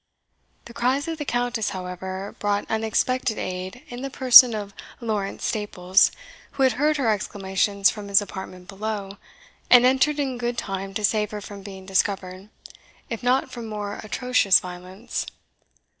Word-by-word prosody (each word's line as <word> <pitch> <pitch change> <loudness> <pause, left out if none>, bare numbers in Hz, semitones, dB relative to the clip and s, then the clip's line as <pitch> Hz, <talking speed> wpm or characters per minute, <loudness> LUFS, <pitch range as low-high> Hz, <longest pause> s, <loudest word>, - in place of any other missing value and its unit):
The 235 - -11
cries 260 +6 0
of 325 -1 -4
the 295 - -3
Countess, 245 -3 -1
however, 185 +1 -6
brought 205 0 0
unexpected 225 +2 0
aid 185 +6 -5
in 245 0 -8
the 275 - -4
person 255 -3 +8
of 205 -1 -6 0.3
Lawrence 210 -4 -3
Staples, 190 -3 +2 0.4
who 275 - 0
had 260 - +5
heard 300 +4 +1
her 245 -6 +2
exclamations 200 -1 0
from 210 -2 -8
his 200 0 +5
apartment 185 -2 -8
below, 200 0 -5 0.5
and 245 0 +8
entered 265 +3 +3
in 265 -3 -2
good 240 0 -2
time 195 -1 -4
to 210 - +1
save 210 0 +1
her 210 - -6
from 200 0 -10
being 190 -1 -10
discovered, 190 0 -1 0.6
if 230 - -4
not 255 +1 +1
from 235 -2 -7
more 210 -1 -5
atrocious 230 -2 +3
violence. 180 +4 -6
210 Hz, 155 wpm, -24 LUFS, 195-245 Hz, 0.6 s, person